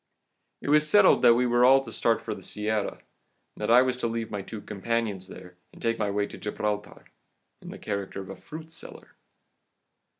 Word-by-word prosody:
"It - - -4
was 150 +1 +4
settled 205 +1 +6
that 120 - +7
we 125 +1 +2
were 120 0 +3
all 135 +2 +7
to 120 -4 -9
start 115 0 +1
for - - -3
the - - -10
Sierra, 105 -1 -2 0.6
that 105 - -3
I 125 +2 +7
was 130 -1 0
to 120 - -1
leave 115 -1 -3
my 100 -1 -3
two 110 +3 -8
companions 105 -2 -3
there, 90 -1 -12
and - - -16
take 115 0 -1
my 105 -1 0
way 100 0 0
to - - -10
Gibraltar, 105 0 -4 0.6
in - - -10
the - - -8
character 100 -2 -4
of 95 - -7
a - - -7
fruit 160 0 -10
seller. 165 - -10
115 Hz, 200 wpm, -27 LUFS, 105-125 Hz, 0.6 s, that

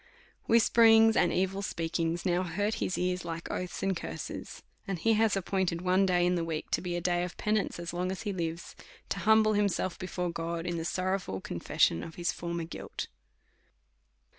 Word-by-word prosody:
Whisper 230 0 +4
ings 225 0 +7
and 175 - +3
evil 190 +1 0
speakings 165 -1 -2
now 180 -1 +2
hurt 200 +5 -1
his - - -1
ears, 180 0 -1
like 165 0 -5
oaths 180 -1 -4
and 195 -1 +1
curses; - - -6 0.2
and 195 -2 -2
he 225 +7 +2
has 220 -2 +3
appointed 185 -2 -1
one 185 +1 +3
day 175 -1 +3
in 180 - +3
the 175 -2 0
week 160 -2 -4
to - - +1
be 175 -1 -3
a 175 - -2
day 175 0 +1
of 180 - -6
penance 215 -1 0
as 170 0 -5
long 180 +1 -1
as 190 - -5
he 205 -2 -2
lives, 170 -2 -4 0.3
to - - -2
humble 220 0 +5
himself 200 -3 0
before 180 -1 -3
God, 170 0 -3
in 175 -1 -2
the 165 - -3
sorrowful 185 - -1
confession 85 -2 +1
of 160 - -8
his 175 -1 0
former 170 -1 -4
guilt. 165 - -6
180 Hz, 190 wpm, -30 LUFS, 170-195 Hz, 0.3 s, ings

